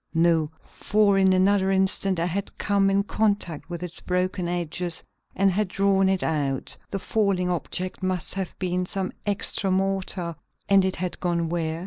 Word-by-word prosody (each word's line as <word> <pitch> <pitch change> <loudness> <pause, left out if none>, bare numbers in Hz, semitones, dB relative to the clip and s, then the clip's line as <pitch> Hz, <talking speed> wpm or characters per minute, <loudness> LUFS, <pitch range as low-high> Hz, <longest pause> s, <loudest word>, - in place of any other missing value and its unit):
No, 165 -2 +3 0.2
for 205 -1 +1
in 190 -1 +5
another 190 +1 +3
instant 190 -1 +1
I 170 - +1
had 190 +3 -3
come 200 -1 +2
in 195 0 +2
contact 200 -7 -1
with 175 0 -5
its 180 0 -6
broken 180 0 -1
edges 175 0 -2 0.3
and 195 0 +3
had 205 +2 0
drawn 195 0 +2
it 190 -1 +1
out; 140 -4 -1
the 195 - -2
falling 195 -3 0
object 180 +2 -4
must 185 -3 0
have 190 -2 -4
been 180 -1 -1
some 190 -1 -2 0.2
extra 200 -1 0
mortar, 190 -3 -1 0.3
and 195 -1 +5
it 190 0 0
had 180 0 -3
gone 170 -2 0
where? 165 -1 -2
185 Hz, 165 wpm, -25 LUFS, 175-195 Hz, 0.3 s, in